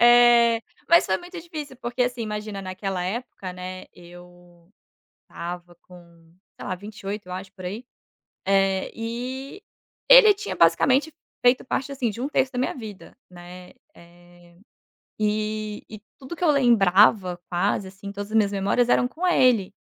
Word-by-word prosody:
eh 240 -1 +6 0.3
mas 340 +1 +6
foi 190 - +1
muito 360 0 -10
difícil, 305 -5 -8
porque, 245 0 -2
assim, 245 -1 -2
imagina, 210 -2 -5
naquela 185 0 -4
época, 195 -2 -5
né, 185 +1 -8
eu 175 0 -17 0.5
estava 175 0 -8
com, 170 -2 -18 0.2
sei - - -8
lá, - - -1
28, 205 0 -7
eu 180 - -8
acho, 185 +1 -7
por 185 -2 -12
aí, 210 +7 -5 0.6
eh, 195 -1 +1
e 255 - -6 0.5
ele - - +9
tinha 415 +1 -5
basicamente 260 - +3 0.3
feito 245 +1 +4
parte, 270 +2 -3
assim, 255 -4 -1
de 220 +3 -8
1 270 - -2
terço 265 -3 0
da 250 - -4
minha 255 - -1
vida, 215 -6 -10
né, 180 0 -12 0.2
eh, 175 0 -20 0.6
e 215 0 -2
e 215 -1 -10 0.2
tudo 265 +5 -9
que 350 - -6
eu 340 - +4
lembrava, 205 -7 +4
quase 190 +2 0
assim, 195 +1 -9
todas 205 +1 -7
as - - -2
minhas 205 -2 +2
memórias 200 +5 +1
eram 245 - +3
com 320 +9 -5
ele. 250 - +3
210 Hz, 155 wpm, -24 LUFS, 180-245 Hz, 0.6 s, ele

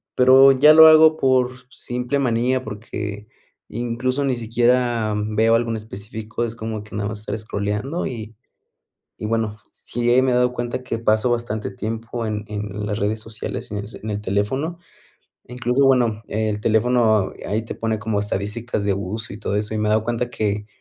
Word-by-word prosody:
pero 130 +2 +7
ya 145 +3 +7
lo 160 0 +10
hago 155 0 +7
por 130 -3 +3 0.2
simple 125 +2 -3
manía, 125 0 +1
porque 105 -1 -6 0.4
incluso 120 +4 -2
ni 135 -2 +1
siquiera 120 -1 +1
veo 110 +2 +2
algo 115 0 0
en 115 - -2
específico. 110 +2 -6
Es 115 -1 -3
como 110 -1 -5
que 105 - -11
nada 105 0 -2
más 105 -1 -6
estar 105 0 -4
scrollando. 105 +9 -3
Y 110 -2 -7 0.8
y - - -4
bueno, 110 -1 -1
sí 120 +1 +1
me 130 - +2
he - - +2
dado 125 0 +2
cuenta 120 +1 -4
que 120 -3 -3
paso 110 +1 +2
bastante 115 -3 -2
tiempo 115 +3 -5
en 105 -1 -3
en 105 0 -5
las 105 0 -2
redes 105 +2 -1
sociales 110 0 -7
en 105 - -2
el 100 0 -6
en 110 - -4
el 105 0 -3
teléfono 105 - -2 0.7
incluso 125 +2 +1
bueno, 120 -5 +3
el 110 -1 -1
teléfono 110 -2 +2 0.2
ahí 110 +2 0
te - - -6
pone 110 -1 -2
como 105 -1 -1
estadísticas 105 +2 -3
de 100 -1 +1
uso 105 +3 -5
y 100 - -8
todo 105 - -2
eso 105 +1 -2
y - - -1
me 105 0 0
he - - +2
dado 110 0 +2
cuenta 120 +1 -2
que, 105 -2 -2
110 Hz, 185 wpm, -21 LUFS, 105-125 Hz, 0.8 s, lo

